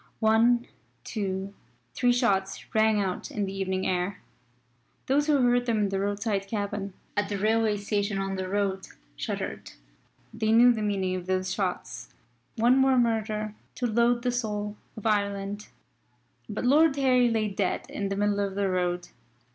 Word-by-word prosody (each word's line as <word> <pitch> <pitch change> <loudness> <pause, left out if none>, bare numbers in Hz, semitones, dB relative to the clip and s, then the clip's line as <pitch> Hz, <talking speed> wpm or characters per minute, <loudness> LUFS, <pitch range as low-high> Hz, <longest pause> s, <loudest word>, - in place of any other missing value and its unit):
One, 230 +2 +4 0.4
two, 195 -2 -3 0.4
three 245 -1 +2
shots 200 -6 0
rang 220 -1 +3
out 190 -2 -2
in 205 -2 -2
the 195 - -5
evening 190 -1 -2
air. 180 +1 -1 0.9
Those 290 +3 +2
who 300 -2 +4
heard 245 0 +3
them 230 -2 +2
in 205 -2 +1
the 195 0 -1
roadside 200 0 -1
cabin, 200 -1 -3 0.2
at 205 -1 0
the 205 - -2
railway 215 +1 +2
station 205 0 -1
on 195 0 -2
the 185 -1 -4
road, 195 -1 -1 0.3
shuddered. - - -5 0.6
They 220 -1 0
knew 240 +2 +7
the 220 - -3
meaning 195 -3 0
of 180 -1 -6
those 185 0 0
shots. 180 - -3 0.5
One 240 +4 +4
more 265 -1 +4
murder 215 -3 0 0.2
to 250 - -2
load 235 +1 +2
the 250 - +1
soul 210 -3 -3 0.2
of 215 - -9
Ireland. 200 -1 -1 0.8
But - - -3
Lord 295 +3 +5
Harry 255 -3 +3
lay 220 -2 0
dead 195 - -1
in 200 -1 -3
the 195 - -2
middle 205 0 +1
of 200 -1 -1
the 200 -1 0
road. 180 -1 -1
205 Hz, 165 wpm, -27 LUFS, 195-230 Hz, 0.9 s, knew